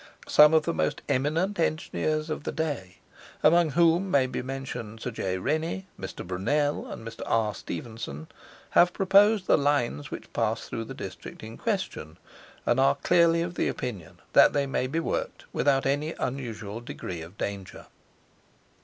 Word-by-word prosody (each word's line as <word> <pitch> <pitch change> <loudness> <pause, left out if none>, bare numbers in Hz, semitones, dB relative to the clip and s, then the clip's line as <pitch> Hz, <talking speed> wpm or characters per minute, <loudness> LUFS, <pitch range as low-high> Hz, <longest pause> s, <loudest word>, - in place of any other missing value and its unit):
Some 150 +1 +7
of 160 - +4
the 170 - -1
most 145 - -1
eminent 165 +9 0
engineers 155 -1 -1
of 155 - -3
the - - -3
day, 145 - -3 0.5
among 170 -1 +5
whom 170 +4 +3
may 140 -7 +4
be 130 - -3
mentioned 125 -4 -6
Sir 125 - -4
J. 95 -4 -2
Rennie, 160 - -1
Mr. 95 - -6
Brunel, 145 +12 0
and 115 - -7
Mr. 115 - -8
R. 110 -2 +1
Stephenson, 105 -7 -6 0.5
have 175 +1 +5
proposed 200 +1 +4
the - - +4
lines 140 - 0
which - - -8
pass - - -1
through - - -4
the - - -8
district - - -8
in 110 +1 -8
question, 190 - -3 0.5
and 120 - +2
are 135 +1 +4
clearly 170 -1 +3
of 175 0 -5
opinion 105 -10 -3
that - - +7
they 140 -1 +1
may 130 -1 -1
be 155 +5 -1
worked 165 - -3
without 135 -1 +2
any 145 +4 0
unusual 115 -4 -4
degree 90 -7 -6
of 85 +5 -11
danger. 100 -2 -5
140 Hz, 160 wpm, -27 LUFS, 110-165 Hz, 0.5 s, Some